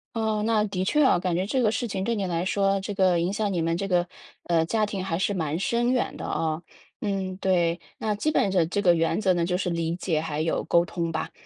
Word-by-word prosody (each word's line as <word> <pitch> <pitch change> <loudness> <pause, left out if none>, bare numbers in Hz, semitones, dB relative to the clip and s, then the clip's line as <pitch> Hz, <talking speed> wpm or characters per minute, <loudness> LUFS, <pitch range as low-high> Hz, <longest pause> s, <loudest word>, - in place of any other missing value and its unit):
哦， 220 -2 0
那 220 -2 +2
的 190 -2 -2
确 300 +8 +3
哦， 220 -10 +4
感 180 -1 -1
觉 180 - +1
这 260 - 0
个 215 - +3
事 240 +1 -2
情 195 -2 -3
对 235 - 0
你 200 -3 -2
来 175 0 -1
说， 195 0 +1
这 205 +1 -4
个 185 -3 +3
影 180 +4 0
响 205 -1 -1
你 175 -3 0
们 165 0 0
这 195 +3 -2
个， 175 -1 +1 0.4
呃， 165 -2 +2
家 215 +2 +1
庭 195 -2 -4
还 165 -3 -2
是 195 +2 0
蛮 160 -3 -1
深 240 +3 +1
远 255 - 0
的 - - -7
哦。 160 0 -1 0.4
嗯， 195 -2 -2
对， 175 -3 +1 0.2
那 215 -1 -1
基 210 +9 -1
本 205 -9 +2
这 185 -3 +3
这 205 - -2
个 175 - +6
原 165 +4 +1
则 190 -3 +3
呢， 175 - 0
就 180 +1 0
是 180 -2 -2
理 165 0 -1
解 165 -4 -1
还 155 -2 -4
有 160 +1 0
沟 170 0 +3
通 170 -2 -3
吧， 160 0 -3
185 Hz, 280 characters per minute, -26 LUFS, 170-205 Hz, 0.4 s, 个